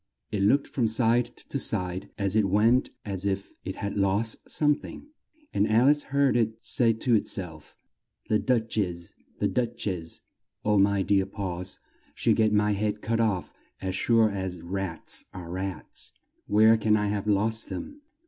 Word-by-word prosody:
It 105 - -1
looked 135 +8 +4
from 120 -4 0
side 115 +1 +2
to - - -6
side 90 0 -1
as 100 -1 0
it 105 -3 +3
went 115 +6 +3 0.2
as 100 -3 -3
if 100 0 -2
it 95 - -5
had 100 +1 -4
lost 100 +3 0
some 150 -1 +3
thing; 290 - -9 0.4
and 105 - +2
Al 115 +3 +4
ice 145 0 +3
heard 140 -2 +1
it 110 -2 +1
say 120 -1 +3
to 115 +2 0
it 110 - +2
self, 80 -6 -6 0.5
"The 105 - +2
Duch 115 -4 0
ess! 85 -4 -3 0.2
The - - +1
Duch 120 -1 -1
ess! 85 -4 -4 0.4
Oh, 105 -1 +3
my 100 0 +3
dear 95 +1 +2
paws! 95 -2 -4 0.4
She'll - - +2
get 110 -1 +3
my 105 0 +3
head 105 +1 -1
cut 115 +1 0
off 100 -8 0 0.3
as 95 -1 -3
sure 110 +2 +3
as 95 -2 -4
rats 95 -1 -3
are 85 -2 -7
rats! 95 -2 -5 0.3
Where 110 +2 +6
can 105 -1 +3
I 105 -1 0
have 105 0 -2
lost 110 +2 +2
them!" 290 +1 -7
105 Hz, 175 wpm, -27 LUFS, 95-115 Hz, 0.5 s, Where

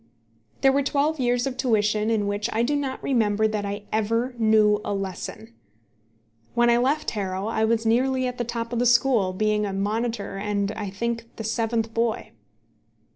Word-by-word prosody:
There 270 - +5
were 280 +1 +2
twelve 290 +2 0
years 245 0 +1
of 265 -2 -3
tuition 215 -4 +1
in 220 -2 +1
which 205 +1 -1
I 225 +2 +1
do 285 +5 +1
not 275 -2 -3
remember 220 -4 +2
that 210 -1 -2
I 200 +1 -5
ever 230 +4 0
knew 215 -1 +4
a 205 - -2
lesson! 195 +4 -6 1.0
When 240 0 +4
I 235 - +4
left 280 +5 +1
Harrow 190 -2 -3
I 220 0 +1
was 225 0 +1
nearly 255 +3 +2
at 250 0 -4
the - - +1
top 235 0 -4
of 235 - 0
the 245 - +3
school, 235 -5 +3
being 210 +2 0
a 200 -2 -2
monitor, 210 +1 -2
and, 200 0 -1
I 210 -2 -5
think, 230 +4 -3
the 225 - -6
seventh 225 0 -1
boy. 230 -1 -1
225 Hz, 180 wpm, -24 LUFS, 210-245 Hz, 1.0 s, There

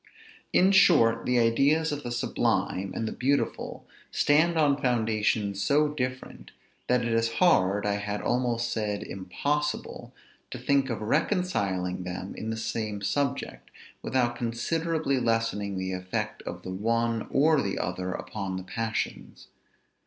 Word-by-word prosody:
In 190 +2 +5
short, 115 -12 +5
the 125 0 +2
ideas 140 +8 +3
of 145 0 -3
the 120 - -5
sublime 100 -4 0
and 115 - -2
the - - -3
beautiful 140 +3 -1 0.2
stand 160 +3 +3
on 145 -2 +3
foundations 110 -5 +1
so 150 +8 +3
different, 130 -3 -5 0.4
that 125 -1 +2
it 115 - 0
is 115 0 +1
hard, 105 - +3
I 100 0 +1
had 105 0 -3
almost 120 -1 0
said 105 -2 -2
impossible, 145 +11 -3 0.4
to - - -6
think 140 -1 +1
of 115 -3 -3
reconciling 105 - 0
them 90 +1 -5
in 110 - -5
the 110 - -2
same 110 -2 -3
subject, 140 - -2 0.3
without 125 -2 0
considerably 140 +5 -1
lessening 115 -4 0
the 95 0 -3
effect 90 0 -3
of - - -6
the 95 - -5
one 115 +3 0
or 150 +1 +4
the 100 - -2
other 90 0 -3
upon 95 -1 -4
the 95 - -6
passions. 110 +4 -4
115 Hz, 140 wpm, -27 LUFS, 100-140 Hz, 0.4 s, In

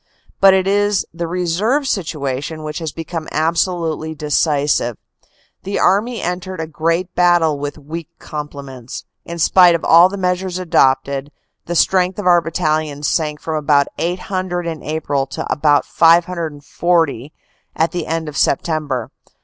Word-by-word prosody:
" - - -34
But 195 -1 +7
it 190 -1 +1
is 205 +1 +1
the 170 0 -4
reserve 180 - 0
situation 155 - -3
which 150 +1 -5
has 160 -3 -4
become 165 0 -6
ab 160 +2 +1
solutely 160 -3 -2
decisive. 145 -5 +1 0.6
The 200 +1 -3
Army 215 +6 +1
entered 180 +1 -4
the 160 - -2
great 165 +3 -1
battle 175 -4 +3
with 145 +1 -5
weak 155 +2 -7
complements. 140 -4 -8 0.2
In 170 - -6
spite 175 +1 +5
of 165 - -3
all 170 +2 +7
the 200 - -6
measures 180 0 -1
adopted, 140 -5 +1 0.4
the 175 - -3
strength 185 +1 +2
of 205 - -5
our 175 -1 +5
battalions 155 -3 -1
sank 150 -2 -1
from 160 -1 -2
about 145 -2 +2
800 180 0 -2
in 160 -3 -4
April 145 -3 -2
to - - -5
about 145 -1 +2
540 165 -3 +1 0.4
at 165 +1 +1
the 175 -2 -4
end 165 0 -2
of 150 - -7
September. 140 -5 0
165 Hz, 150 wpm, -18 LUFS, 150-180 Hz, 0.6 s, But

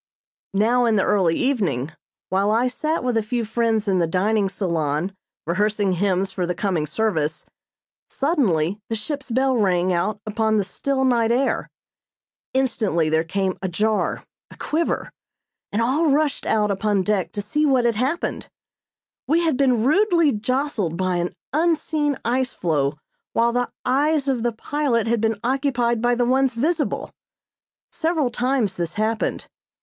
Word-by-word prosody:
Now 240 +5 +3
in 225 -2 +2
the 195 - +3
early 185 -5 +2
evening, 175 - 0 0.4
while 195 +2 +1
I 230 +4 +2
sat 310 +4 -2
with 250 -2 0
a - - +3
few 230 +2 -2
friends 225 -1 0
in 190 -2 +2
the 170 - +2
dining 195 +4 +1
salon 170 -2 -1 0.3
rehearsing 205 +3 +1
hymns 190 +1 0
for 180 -3 -2
the 180 - -2
coming 175 -7 -1
service, 160 -4 -1 0.6
suddenly 210 - 0
the 225 - -1
ship's 275 +5 -5
bell 260 +2 +2
rang 185 -4 +2
out 190 +5 -1
upon 220 0 +1
the 205 - +2
still 265 +7 -1
night 235 -3 +2
air. 260 +3 0 0.9
Instantly 215 -11 +1
there 160 +1 +2
came 190 +2 -2
a 190 - -1
jar, 215 +4 0 0.3
a - - -15
quiver, 325 +2 -1 0.6
and 220 +3 +1
all 295 +7 +2
rushed 290 0 +1
out 210 -2 +2
upon 200 0 +1
deck 200 -3 0
to 205 - -2
see 300 +9 0
what 265 -5 +3
had 235 - +3
happened. 265 +9 -2 0.8
We 325 +3 +3
had 325 -4 +1
been 255 -4 +2
rudely 335 - +3
jostled 220 - -1
by 185 -1 0
an 175 +1 -2 0.2
unseen 310 -3 +1
ice 255 +2 0
floe 150 -4 0 0.4
while 235 +1 +3
the 245 0 0 0.2
eyes 285 +2 +2
of 260 -4 0
the 240 +1 +1
pilot 240 0 -1
had 230 -1 0
been 225 -2 0
occupied 245 -3 0
by 240 0 +2
the 245 0 +1
ones 260 0 +2
visible. 300 +5 -1 0.8
Several 315 -6 0
times 245 -4 0
this 175 -2 -4
happened. 215 +1 -1
225 Hz, 155 wpm, -22 LUFS, 195-265 Hz, 0.9 s, Now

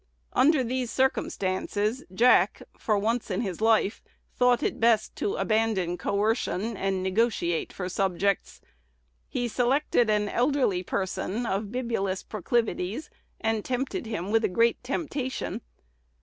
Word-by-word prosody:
Under 275 +1 +4
these 250 0 -2
circumstances, 215 -2 0
Jack, 240 +7 +4
for 215 -2 0
once 225 +4 -1
in - - -1
his 195 -4 -4
life, 220 -2 +3 0.3
thought 250 -1 +3
it - - -1
best 225 -2 +3
to 200 - -1
abandon 195 -3 +1
coercion, 215 +2 -1
and 195 -1 -1
negotiate 190 -4 0
for 180 - -5
subjects. 195 +1 -1 0.7
He 245 - -1
selected 245 0 +2
an 210 -1 +2
elderly 245 -5 +1
person 190 +4 -2
of 200 -1 -2
bibulous 230 -6 -2
proclivities, 220 - -1 0.3
and 220 -1 0
tempted 255 -2 -2
him 195 -3 -3
with 225 +1 +3
a - - +4
great 230 +6 +2
temptation. 265 -3 -3
220 Hz, 125 wpm, -27 LUFS, 195-245 Hz, 0.7 s, Under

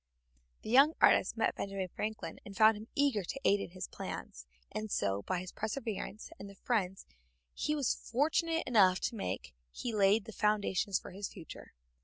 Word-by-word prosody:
The 215 - -5
young 275 +5 +7
artist - - +4
met - - +2
Benjamin 195 -2 -4
Franklin 215 +4 -5
and 200 -1 -10
found 220 0 +7
him 215 +2 -9
eager 275 -8 +2
to 225 - -5
aid 200 - +5
him - - -3
in - - -12
his 185 +1 -6
plans, 65 +1 -7 0.2
and 215 0 -4
so, 100 - 0
by 185 - -2
his 185 - -8
perseverance 220 +1 -4
and 200 - -8
the 200 - -13
friends 195 -4 -1 0.5
he 300 - -1
was 280 -5 +1
fortunate 325 +6 0
enough 190 -6 +5
to - - -1
make, 95 - -4 0.2
he 235 - -4
laid 205 +1 +4
the 225 - -8
foundations 205 -2 +1
for - - -9
his 195 +2 -4
future. 170 -6 -11
210 Hz, 185 wpm, -33 LUFS, 190-230 Hz, 0.5 s, young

